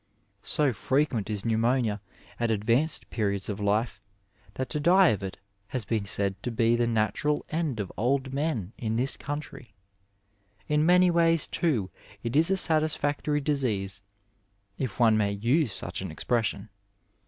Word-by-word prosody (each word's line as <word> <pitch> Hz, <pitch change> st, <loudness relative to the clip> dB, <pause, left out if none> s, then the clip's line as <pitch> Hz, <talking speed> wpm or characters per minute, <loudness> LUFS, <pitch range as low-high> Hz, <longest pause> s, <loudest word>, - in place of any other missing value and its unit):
So 145 Hz, +1 st, +1 dB
frequent 130 Hz, -1 st, 0 dB
is 105 Hz, -1 st, -3 dB
pneumonia 115 Hz, -1 st, +1 dB, 0.4 s
at 120 Hz, -1 st, 0 dB
advanced 115 Hz, +8 st, +1 dB
periods 100 Hz, -3 st, -1 dB
of 105 Hz, 0 st, -4 dB
life 105 Hz, 0 st, -1 dB, 0.5 s
that 130 Hz, -, -3 dB
to 150 Hz, -, -1 dB
die 180 Hz, +4 st, +5 dB
of 105 Hz, -, -1 dB
it 95 Hz, -1 st, -6 dB, 0.3 s
has 125 Hz, -3 st, -4 dB
been 110 Hz, -2 st, -1 dB
said 100 Hz, -1 st, -2 dB
to -, -, -3 dB
be 115 Hz, 0 st, +2 dB
the 120 Hz, 0 st, +1 dB
natural 115 Hz, +6 st, 0 dB
end 155 Hz, -7 st, -1 dB
of 100 Hz, -3 st, -4 dB
old 130 Hz, +4 st, 0 dB
men 135 Hz, -, -2 dB
in 110 Hz, -1 st, -2 dB
this 130 Hz, +4 st, 0 dB
country; 145 Hz, -7 st, -7 dB, 0.9 s
In 150 Hz, +1 st, +2 dB
many 180 Hz, 0 st, +5 dB
ways, 165 Hz, -2 st, +3 dB
too, 120 Hz, -, -1 dB, 0.3 s
it 115 Hz, +2 st, -3 dB
is 160 Hz, +4 st, +5 dB
a 195 Hz, -, +2 dB
satisfactory 150 Hz, -3 st, +1 dB
disease, 110 Hz, -10 st, -1 dB, 0.8 s
if 125 Hz, -6 st, -4 dB
one 115 Hz, -2 st, +5 dB
may 100 Hz, -1 st, +1 dB
use 120 Hz, +6 st, +1 dB
such 90 Hz, 0 st, -2 dB
an 95 Hz, -, -5 dB
expression. 115 Hz, +6 st, -2 dB
120 Hz, 155 wpm, -27 LUFS, 105-150 Hz, 0.9 s, die